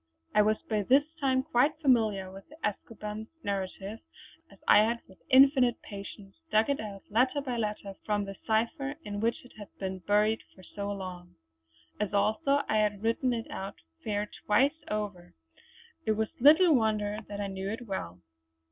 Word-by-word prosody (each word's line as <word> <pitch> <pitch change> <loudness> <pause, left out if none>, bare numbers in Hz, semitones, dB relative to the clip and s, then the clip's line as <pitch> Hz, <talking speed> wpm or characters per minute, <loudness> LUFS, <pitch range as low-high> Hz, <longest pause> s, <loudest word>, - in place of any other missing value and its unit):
I 210 - +6
was 215 +1 +3
by 215 -2 +1
this 265 +8 +5 0.2
time 260 -2 +2
quite 295 0 +2
familiar 220 -10 +2
with 195 0 -12
de 305 - -13
Escoban's 210 +1 -6 0.2
narrative, 195 +2 -4 0.5
as - - -17
I - - +8
had 230 +2 +2
with 190 - -19
infinite 260 -2 +6
patience 200 -1 -9 0.2
dug 220 +6 +4
it 280 - -1
out 200 -2 -7
letter 255 +6 +3
by 255 -4 -3
letter 210 -3 -3
from 205 -1 0
the 195 0 -7
cipher 235 +6 0
in 205 0 -4
which 230 +3 -1
it 250 - -15
had 205 - -8
been 190 -1 -4
buried 210 +4 +2
for 185 - -16
so 200 +2 -5
long. 185 -3 -7 0.6
As 205 -1 -1
also 275 +8 +2
I 215 - +2
had 210 -1 +1
written 230 +3 +1
it 230 -2 -3
out 195 +1 -5 0.3
fair 210 -1 -1 0.2
twice 275 +9 +3
over, 205 -5 -4 0.7
it 220 - +2
was 220 0 -1
little 315 +5 +7
wonder 215 -4 +1
that 205 0 -6
I 205 - -1
knew 195 0 -4
it 225 +4 -4
well. 90 - -5
215 Hz, 175 wpm, -30 LUFS, 200-245 Hz, 0.7 s, I